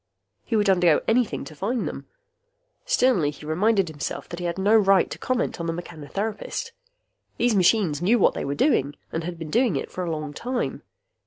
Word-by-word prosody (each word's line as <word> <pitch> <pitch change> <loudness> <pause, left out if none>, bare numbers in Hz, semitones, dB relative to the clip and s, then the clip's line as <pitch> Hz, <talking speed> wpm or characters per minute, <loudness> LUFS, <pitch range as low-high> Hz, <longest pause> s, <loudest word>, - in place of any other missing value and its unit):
He 230 - -2
would 210 -1 +2
undergo 180 -4 +4
anything 230 - +1
to 140 - -10
find 215 - -2
them. - - -7 0.8
Sternly 255 - +3
he 150 +1 -10
reminded 195 +5 +2
himself 155 -1 -5
that 170 - -6
he 175 - -4
had 170 - -3
no 205 +3 +3
right 195 -3 +5
to - - -6
comment 255 -6 -1
on 170 - -3
the 165 - -1
mechanotherapist. 185 - -5 0.7
These 240 -2 +2
machines 180 -5 +3
knew 210 +7 +4
what 205 - +4
they - - -4
were 140 +1 -2
doing 145 - +2 0.2
and 165 - -3
had 175 +1 -5
been 160 -2 -7
doing 235 - +2
it - - -4
for 185 - -4
a 175 - -3
long 155 -2 -4
time. 245 - -3
185 Hz, 195 wpm, -24 LUFS, 160-225 Hz, 0.8 s, right